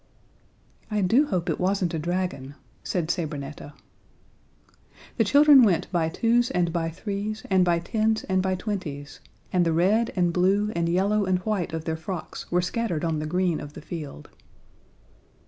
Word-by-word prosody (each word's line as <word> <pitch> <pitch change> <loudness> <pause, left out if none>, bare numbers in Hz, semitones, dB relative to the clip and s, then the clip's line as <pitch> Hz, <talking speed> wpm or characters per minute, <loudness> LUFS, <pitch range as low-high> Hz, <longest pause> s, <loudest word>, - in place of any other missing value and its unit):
"I 210 -1 0
do 235 +11 +3
hope 180 -7 -2
it - - -1
wasn't 185 -2 0
a 160 - -1
dragon," 170 -5 -3 0.3
said 175 -3 -1
Sabrinetta. 150 -3 -5 1.4
The 225 - +4
children 285 +5 +7
went 190 -9 +2
by 165 -3 +1
twos 235 +7 +2
and 175 -2 0
by 165 -2 -1
threes 205 +5 -5
and 190 -1 +5
by 175 -1 +2
tens 220 +5 0
and 190 -1 0
by 190 0 0
twenties, 160 -9 -5 0.3
and 180 -1 +3
the 165 -1 +1
red 200 +8 +2
and 175 -2 +1
blue 195 +4 +2
and 170 0 0
yellow 200 +4 +2
and 185 -1 +2
white 210 -5 -1
of 160 -1 -5
their 160 -1 -2
frocks 165 +1 -7
were 180 0 +2
scattered 180 -5 -2
on 160 -2 -1
the 155 - -3
green 180 0 0
of 145 0 -9
the - - -10
field. 150 - -8
180 Hz, 165 wpm, -25 LUFS, 165-205 Hz, 1.4 s, children